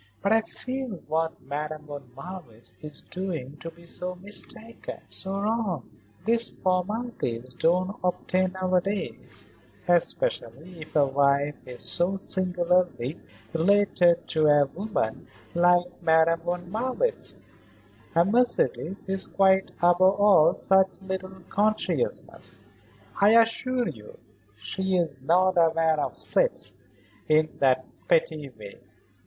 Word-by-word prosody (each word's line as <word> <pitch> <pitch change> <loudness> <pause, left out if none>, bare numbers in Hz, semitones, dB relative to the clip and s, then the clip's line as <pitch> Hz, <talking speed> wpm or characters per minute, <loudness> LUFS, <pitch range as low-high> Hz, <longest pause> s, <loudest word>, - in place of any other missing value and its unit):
"But 200 - +3
I 225 - +4
feel 255 +3 -5 0.2
what 160 +1 -1
Madame 150 +2 -5
von 145 -3 -9
Marwitz 135 -7 -9
is 150 -1 -7
doing 165 -7 -5
to 165 - -7
be 170 +1 -17
so 180 +1 -5
mistaken, 210 +4 -5
so 195 +1 -3
wrong." 200 - -2 0.3
"These 230 +1 +2
formalities 185 - -2
don't 185 +6 +1
obtain 185 +1 0
nowadays, 185 +2 -2 0.4
especially 170 -2 0
if 155 - -11
a 145 -2 +5
wife 140 +1 +2
is 125 -2 -7
so 185 +3 +2
singularly 180 -7 0 0.3
related 175 -1 +3
to 155 -2 +2
a 145 -1 +5
woman 175 - -3 0.3
like 175 +1 +2
Madame 165 0 +4
von 175 +1 -4
Marwitz. 260 - -1 0.8
And 170 +4 +4
Mercedes 230 -6 +1
is 190 0 -1
quite 190 0 +3
above 175 +1 +4 0.2
all 185 -5 +6
such 190 -1 +3
little 190 0 -5
consciousnesses, 215 - -1 0.6
I 215 +3 +7
assure 245 +2 +1
you. 105 -2 -11 0.4
She 190 - -2
is 155 -7 -1
not 180 +5 +3
aware 160 -1 +2
of - - -3
sets, - - 0 0.6
in 155 0 +4
that 130 -1 +3 0.2
petty 155 -3 +1
way. 110 -5 -12
180 Hz, 115 wpm, -26 LUFS, 155-195 Hz, 0.8 s, I